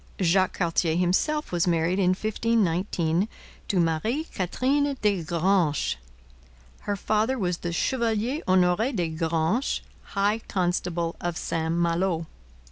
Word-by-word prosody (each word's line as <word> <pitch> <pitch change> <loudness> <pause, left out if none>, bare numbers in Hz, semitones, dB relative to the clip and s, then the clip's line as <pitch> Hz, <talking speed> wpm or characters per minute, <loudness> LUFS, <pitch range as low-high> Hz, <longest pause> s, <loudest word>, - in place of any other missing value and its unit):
Jacques 185 +1 +2
Cartier 165 -2 +1
himself 185 - +1
was 175 0 +1
married 170 +2 +1
in 185 -1 +3
1519 190 -5 0 0.4
to 190 - +1
Marie 175 - 0
Katherine 275 +9 0
des 205 -4 +1
Granches. 170 - +1 0.8
Her 205 - -2
father 215 +6 0
was 180 -5 -1
the 175 - -3
Chevalier 235 - 0
Honore 185 +6 +3
des 175 -6 -1
Granches, 165 - 0 0.3
high 205 +3 +2
constable 175 -2 -1
of 175 -2 -2
St 160 0 -1
Malo. 170 0 +1
180 Hz, 120 wpm, -26 LUFS, 170-215 Hz, 0.8 s, in